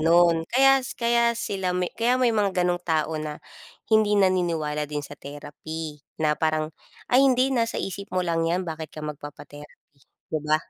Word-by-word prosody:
gano'n 170 +1 +5
kaya 270 +2 +5
s 255 - -7
kaya 235 0 +2
sila 190 -5 -2
may 180 -1 -1
kaya 240 +2 +2
may 250 -2 +3
mga 195 -4 +1
gano'ng 175 0 +1
tao 160 -2 0
na 150 -1 -5 0.6
hindi 215 -1 +4
naniniwala 165 -6 +1
din 145 -1 -4
sa - - -10
therapy 150 +2 -7 0.2
na 155 -1 +2
parang, 155 0 -1 0.4
"Ay, 255 - +7
hindi, 255 +1 +2
nasa 230 -3 0
isip 200 +1 -4
mo 185 -1 0
lang 165 -1 0
'yan. 180 +2 0
Bakit 160 -2 -5
ka 155 -1 -8
magpapa-therapy?" 145 -1 -10 0.3
'Di 155 - 0
ba? 155 0 +3
175 Hz, 175 wpm, -25 LUFS, 155-210 Hz, 0.6 s, Ay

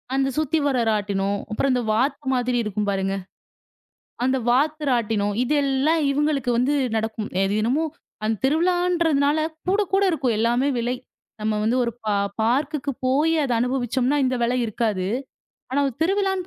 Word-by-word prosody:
அந்தச் 270 -1 0
சுத்தி 310 +1 +1
வர்ற 265 -3 +1
ராட்டினம். 200 -1 0
அப்புறம் 265 +5 +1
அந்த 250 - +1
வாத்து 265 +5 0
மாதிரி 245 0 0
இருக்கும் 210 -1 -2
பாருங்க 195 0 -1 1.1
அந்த 260 +1 +2
வாத்து 300 +5 +2
ராட்டினம். 220 -4 +1
இதெல்லாம் 285 +3 +1
இவுங்களுக்கு 285 -2 0
வந்து 255 +4 +2 0.2
நடக்கும். 220 -1 -2
எ - - +3
தினமும், 250 +10 +1 0.4
அந்தத் 220 -1 -1
திருவிழான்றதுனால, 325 -2 +2 0.3
கூட 395 +3 +3
கூட 390 +1 +4
இருக்கும். 260 -8 0
எல்லாமே 240 +4 +2
விலை. 240 +2 -1 0.5
நம்ம 215 0 0
வந்து 225 +3 +1
ஒரு 235 - -1
பார் 200 -1 0
பார்க்குக்கு 280 +5 0
போயி 290 +5 +2
அத 270 - -1
அனுபவிச்சோம்ன்னா, 250 +2 0
இந்த 255 0 0
விலை 245 +2 +1
இருக்காது. 215 -4 -1 0.7
ஆனா 280 +2 +1
ஒரு 265 - -7
திருவிழான்னு 385 0 0
255 Hz, 145 wpm, -23 LUFS, 220-295 Hz, 1.1 s, கூட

